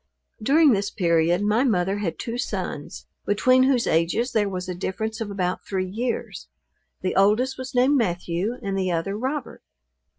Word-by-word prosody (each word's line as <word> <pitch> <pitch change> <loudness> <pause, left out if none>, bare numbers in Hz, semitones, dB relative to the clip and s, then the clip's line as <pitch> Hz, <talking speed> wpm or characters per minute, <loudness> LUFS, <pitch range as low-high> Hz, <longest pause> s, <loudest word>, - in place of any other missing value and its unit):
During 290 +6 +5
this 200 -2 +1
period 170 0 +2
my 215 +4 +2
mother 195 -5 +1
had 185 -5 -3
two 235 +1 -4
sons, - - -4 0.2
between 255 +5 +3
whose 260 -2 +3
ages 170 +10 +1
there 210 -3 +1
was 185 -1 -5
a 180 - -3
difference 220 +5 -4
of 220 - -3
about 185 -2 -2
three 190 -1 -1
years: 230 +5 -4 0.5
the 185 - -2
oldest 215 +7 +3
was 260 0 -7
named 260 +4 +4
Matthew, 180 +1 -1
and 195 -1 -2
the 185 -1 0
other 170 +4 -1
Robert. 265 +7 -4
205 Hz, 165 wpm, -24 LUFS, 185-245 Hz, 0.5 s, During